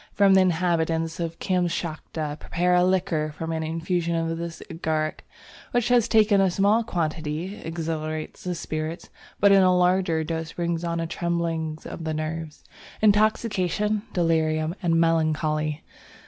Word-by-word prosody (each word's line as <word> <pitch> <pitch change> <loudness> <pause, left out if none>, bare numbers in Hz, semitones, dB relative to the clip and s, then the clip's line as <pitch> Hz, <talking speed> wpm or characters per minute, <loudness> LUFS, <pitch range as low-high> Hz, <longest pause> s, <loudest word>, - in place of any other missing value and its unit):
The 205 - +2
inhabitants 170 -3 +2
of 165 -1 -3
Kamschatka 165 -4 -2
prepare 180 +1 0
a 180 0 +5
liquor 170 -5 0
from 165 +1 -5
an 160 0 -2
infusion 165 +1 -1
of 165 0 -1
this 170 0 -6
Agaric 155 -2 -2 0.5
which 245 -1 +1 0.2
taken 210 -2 +5
in 195 - +4
a - - +2
small 200 +5 +3
quantity 165 +1 -3
exhilarates 155 -1 -4
the 180 -1 -2
spirits, 155 0 -5 0.3
but 200 0 +5
in 195 -1 +7
a 185 -1 +4
larger 180 -3 +2
dose 160 0 -4
brings 170 -1 -2
on 170 -1 -1
a 165 - -1
trembling 165 -2 -2
of 165 - -7
the 160 -1 -2
nerves, 155 0 -5 0.4
intoxication, 210 -1 +2
delirium 160 -2 +1
and 165 -2 +2
melancholy. 155 -2 +1
165 Hz, 140 wpm, -25 LUFS, 160-180 Hz, 0.5 s, in